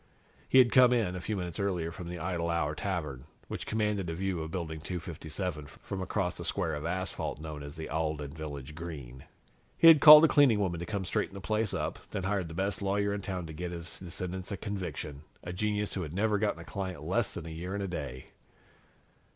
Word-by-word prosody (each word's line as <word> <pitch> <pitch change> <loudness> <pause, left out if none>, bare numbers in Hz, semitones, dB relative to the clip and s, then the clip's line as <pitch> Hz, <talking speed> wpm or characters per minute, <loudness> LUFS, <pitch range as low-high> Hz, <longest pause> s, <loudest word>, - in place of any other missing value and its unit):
He - - +5
had 125 -2 +7
come 125 -1 +7
in, 105 -7 +1
a 90 - -4
few 105 +2 -2
minutes 90 -2 -4
earlier, 90 -5 -1
from 85 0 -7
the 90 - -5
Idle 85 0 -2
Hour 75 -3 0
Tavern, 75 -7 -3 0.2
which - - -5
commanded 105 -4 0
a 80 - -3
view 95 -1 -1
of 80 - -4
Building 80 -3 -4
257 80 -2 -5
from 95 +6 -7
across 95 -1 -1
the 85 - -5
square 85 -1 0
of 75 +2 -3
asphalt 95 -3 -2
known 75 -1 -6
as 70 0 -8
the 80 - -6
Alden 75 -2 -2
Village 75 -3 -6
Green. 75 -6 -8 0.5
He 165 - +9
had 155 -3 +8
called 150 +1 +12
a - - +6
cleaning 140 -8 +5
woman 90 -4 0
to 85 - -5
come 100 -3 -2
straighten 95 - -1
the - - -5
place 110 +1 0
up, - - -2
then 95 - -3
had 95 - -1
hired 100 -4 0
the 80 - -8
best 100 +3 -1
lawyer 100 +1 +1
in 100 - -3
town 95 -3 -4
to 80 - -8
get 90 +3 -4
his 85 -1 -6
descendants 90 +1 -5
a 100 - -2
conviction, 90 -8 -5 0.2
a 90 - -5
genius 105 +2 -1
who 95 - -2
had 80 -3 -5
never 105 +1 +2
gotten 105 -5 0
a - - -10
client 95 -6 -5
less 100 +7 0
than 85 - -7
a - - -6
year 85 +4 -5
and 100 - -2
a - - -2
day. 70 -8 -6
90 Hz, 225 wpm, -30 LUFS, 80-100 Hz, 0.5 s, called